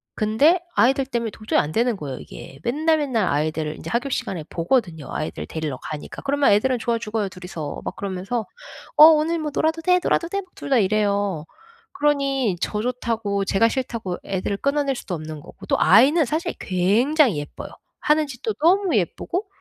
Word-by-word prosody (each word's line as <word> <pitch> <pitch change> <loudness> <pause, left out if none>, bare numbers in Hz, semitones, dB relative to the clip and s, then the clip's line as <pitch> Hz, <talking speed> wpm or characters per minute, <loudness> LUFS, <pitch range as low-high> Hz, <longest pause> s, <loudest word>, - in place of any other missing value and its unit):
근데 250 +12 +3 0.2
아이들 270 +2 +3
때문에 235 -4 -2
도저히 215 +1 0
안 150 - -1
되는 235 -1 +1
거예요 140 -6 -6
이게. 135 - -11
맨날맨날 285 - +1
아이들 155 +1 -1
인제 - - -8
하교 240 +4 -1
시간에 185 - -3
보거든요. 170 - -1
아이들 155 - -4
데리러 155 -5 -4
가니까. 150 +2 -7
그러면 280 -3 +2
애들은 250 +5 +3
좋아 230 0 -1
죽어요 215 -2 -2
둘이서. 180 -5 -7
막 - - -4
그러면서 200 +4 -3 0.5
"어 305 - +11
오늘 320 +1 +4
뭐 305 -1 -3
놀아도 320 +2 0
돼? 360 +2 +3
놀아도 335 - +1
돼?" 395 +2 -2
2 - - -8
다 270 - +4
이래요. 200 -4 0 0.5
그러니 275 - +1
저 210 - -1
좋다고 225 -4 -1
제가 195 +4 +3
싫다고 230 -8 -3
애들을 195 +1 -2
끊어낼 280 +2 0
수도 190 -6 -5
없는 155 -1 -7
거고 - - -13
또 - - +2
아이는 270 - +5
사실 320 +7 -2
굉장히 220 - +2
예뻐요. 145 - -8 0.3
하는 300 0 +2
짓도 280 - -4
너무 365 0 +3
예쁘고 345 - -2
230 Hz, 385 characters per minute, -22 LUFS, 185-285 Hz, 0.5 s, 어